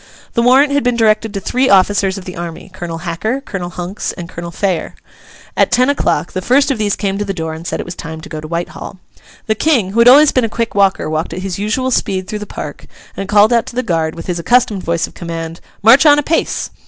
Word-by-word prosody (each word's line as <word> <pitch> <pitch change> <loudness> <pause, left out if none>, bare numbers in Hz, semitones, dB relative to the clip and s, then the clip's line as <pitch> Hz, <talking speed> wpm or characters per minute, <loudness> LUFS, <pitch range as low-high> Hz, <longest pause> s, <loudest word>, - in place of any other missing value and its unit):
The 235 - +2
warrant 270 +4 +4
had 285 - +1
been 245 -1 +1
directed 220 -1 +2
to - - -1
three 255 +7 0
officers 195 0 +3
of 190 - -9
the 180 - -7
army, 170 +2 -7
Colonel 175 -3 -5
Hacker, 215 +10 -2
Colonel 195 -10 -6
Hunks, 180 +3 -5
and 175 -2 -8
Colonel 170 +1 -7
Phayer. 185 0 -2 0.6
At - - +2
ten 255 +3 +3
o'clock, 175 - -1
the 185 - -3
first 275 +7 +3
of 255 - -2
these 205 -2 +1
came 195 -1 -2
to - - 0
the 195 -1 -4
door 160 -2 -4
and 160 +2 -8
said - - -3
it - - -4
was 175 - -6
time 160 -2 -7
to 185 - -10
go 155 -4 -6
to 155 - -8
Whitehall. 170 +3 -5 0.5
The 220 - +1
King, 225 -6 +1
who 225 - -1
had 235 - +6
always 285 +4 +8
been 255 - +1
a 225 - 0
quick 230 +1 -2
walker, 195 -5 +2
walked 155 +1 -2
at 185 +2 -5
his 195 -1 -4
usual 240 +6 -1
speed 190 -5 -1
through 210 - -4
the 210 - -7
Park, - - -8 0.3
and 195 - -5
called 210 +3 +5
out 235 -1 +2
to - - -9
the 255 - 0
guard, 165 -6 -1
with 165 - -8
his 175 -2 -3
accustomed 220 0 +2
voice 170 0 0
of - - -14
command, 165 -1 -6 0.2
'March 255 +7 +7
on 290 0 +7
apace! 295 +3 -1
200 Hz, 250 wpm, -16 LUFS, 175-235 Hz, 0.6 s, always